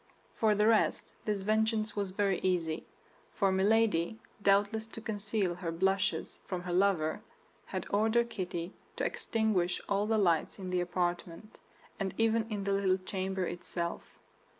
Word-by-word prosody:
For 220 -3 +3
the 210 +1 +3
rest 220 -1 +2
this 205 -2 -1
vengeance 215 0 +1
was 200 -2 -1
very 195 0 +1
easy; 170 -4 -1 0.5
for 195 -2 +3
Milady, 205 -1 +2 0.2
doubtless 205 +3 +3
to 225 - -7
conceal 210 -4 -1
her 175 -1 -4
blushes 190 +3 0
from 180 -2 -3
her 180 -1 -3
lover, 180 -4 +2 0.5
had - - -3
ordered 225 +3 +2
Kitty 175 -1 -4 0.2
to - - -1
extinguish 215 -6 0
all 200 +1 +1
the 220 0 +2
lights 170 -6 +2
in 185 -2 -5
the 180 -1 +1
apartment, 175 +2 -3 0.4
and 190 -2 -2
even 225 0 +2
in 205 -2 -3
the 200 0 0
little 195 -1 +2
chamber 190 0 -2
itself. 170 0 -5
195 Hz, 150 wpm, -32 LUFS, 180-215 Hz, 0.5 s, For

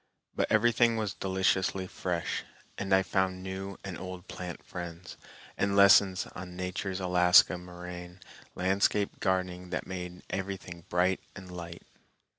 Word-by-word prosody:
But - - 0
everything 115 +1 +4
was 105 -3 -1
deliciously 95 0 +1
fresh, 90 -2 -2 0.3
and 95 0 -4
I 95 0 +5
found 95 0 0
new 95 +1 -5
and 95 -3 -6
old 90 -1 -7
plant 90 -2 -7
friends, 85 0 -7 0.4
and 100 0 +1
lessons 100 -1 +6
on 90 0 -8
Nature's 90 +1 -3
Alaska 90 0 +6
moraine 90 0 -9 0.4
landscape 100 +2 +1
gardening 90 -2 -1
that 90 - -3
made 90 -1 -6
everything 95 -3 -5
bright 90 +1 +2 0.2
and 95 -1 -10
light. 85 -1 -8
95 Hz, 130 wpm, -30 LUFS, 90-95 Hz, 0.4 s, lessons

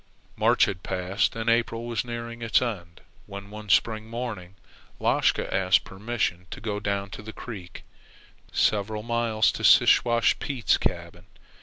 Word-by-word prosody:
March - - +4
had 90 -2 -5
passed 95 +4 -1
and 115 0 -4
April 115 0 +1
was 120 -2 -2
nearing 115 -1 -6
its 115 -2 +3
end, 90 -9 -5 0.3
when, 100 +1 -9
one 105 0 -9
spring 110 +4 +2
morning, 110 -6 -6 0.4
Lashka - - +1
asked 95 -2 +3
permission 95 -3 -3
to - - -8
go 105 -2 -3
down 100 -1 -2
the 110 +1 -8
creek 95 -8 -9 0.7
several 105 +1 0
miles 115 -2 +1
to - - -7
Siwash 120 -1 +5
Pete's 130 -7 0
cabin. - - -4
110 Hz, 140 wpm, -26 LUFS, 95-115 Hz, 0.7 s, Siwash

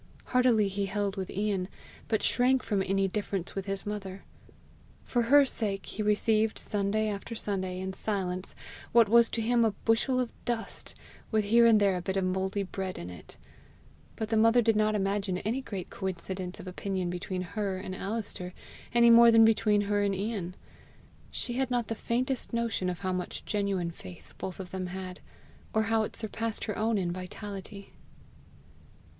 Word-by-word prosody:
Heartily 250 -5 +3
he 195 0 -2
held 200 0 -1
with 190 -2 -4
Ian, 200 -2 -1 0.4
but 220 - 0
shrank 255 +1 +3
from 205 -3 0
any 195 0 +1
difference 195 -2 -3
with 195 0 -4
his 195 0 -3
mother. 195 -2 -5 0.8
For 240 - 0
her 280 +5 +6
sake 205 -6 -2
he - - -5
received 215 +1 +2
Sunday 210 +1 0
after 210 +2 -4
Sunday 190 -4 -2
in 190 0 -4
silence 190 -3 -3 0.4
what 230 -2 +7
was 235 +2 +6
to 225 - -2
him 235 +1 +3
a 220 -2 +2
bushel 235 +3 +2
of 245 -2 -1
dust 235 -2 -4 0.3
with 215 -2 +1
here 230 +3 +6
and 220 -2 +6
there 200 -2 +3
a - - -3
bit 190 +2 -2
of 190 - +1
mouldy 190 +2 -1
bread 190 0 -4
in 85 +1 -6
it; 90 - -12 0.8
but 220 -1 -3
the 225 - +2
mother 230 +2 +5
did 225 -2 +3
not 215 0 +2
imagine 195 -1 0
any 225 +8 -2
great 195 -8 -6
coincidence 185 0 -4
of - - -8
opinion 185 -1 -3
between 180 +1 -3
her 195 +1 -3
and 185 0 -6
Alister 195 -3 -4 0.4
any 235 0 +7
more 235 0 +9
than 225 -1 +7
between 210 -2 +3
her 205 0 +1
and 200 -1 +1
Ian. 195 -3 -3 0.7
She 240 - -4
had 260 +1 0
not 245 -2 0
the - - 0
faintest 250 +3 -2
notion 230 -5 0
how 185 +1 -2
much 180 0 -4
genuine 195 -4 -1
faith 90 - -12
both 190 0 -5
of 185 -2 -7
them 185 -1 -3
had, 185 0 -6 0.6
or 220 - +4
how 225 +1 +2
it 215 - -3
surpassed 225 0 -1
her 210 - -3
own 220 0 +1
in 180 -3 0
vitality. 195 +2 -7
205 Hz, 175 wpm, -29 LUFS, 190-225 Hz, 0.8 s, more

